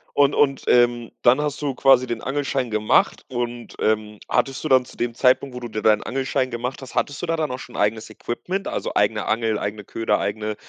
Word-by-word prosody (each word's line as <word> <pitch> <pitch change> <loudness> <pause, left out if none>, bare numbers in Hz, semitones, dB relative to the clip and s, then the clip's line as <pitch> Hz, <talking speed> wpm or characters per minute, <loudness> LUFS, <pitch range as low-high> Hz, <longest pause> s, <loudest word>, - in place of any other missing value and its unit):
Und 145 0 +4
und, 140 -2 +2
ähm, 120 -1 +3
dann 125 +3 +5
hast 150 0 -2
du 140 -3 -2
quasi 130 -1 +4
den 120 -2 -3
Angelschein 135 -3 -2
gemacht 110 0 +2
,und, 120 -1 -4
ähm, 105 -1 0
hattest 135 -1 0
du 155 - -1
dann 130 -1 +5
zu - - -16
dem 120 -1 -1
Zeitpunkt, 130 +1 +2
wo - - -4
du 120 - -5
dir 110 -1 -4
deinen 105 -1 +4
Angelschein 130 0 -1
gemacht 125 +3 -4
hast 130 - -10
hattest 145 - -1
du - - -2
da 165 - +1
dann 155 -3 -1
auch 125 - -4
schon 125 - -11
ein - - 0
eigenes 110 +2 0
Equipment, 180 - -4
also - - -3
eigene 105 0 +1
Angel, 110 0 0
eigene 105 0 -4
Köder, 110 -1 0
eigene 105 +1 -2
120 Hz, 225 wpm, -22 LUFS, 110-135 Hz, -, dann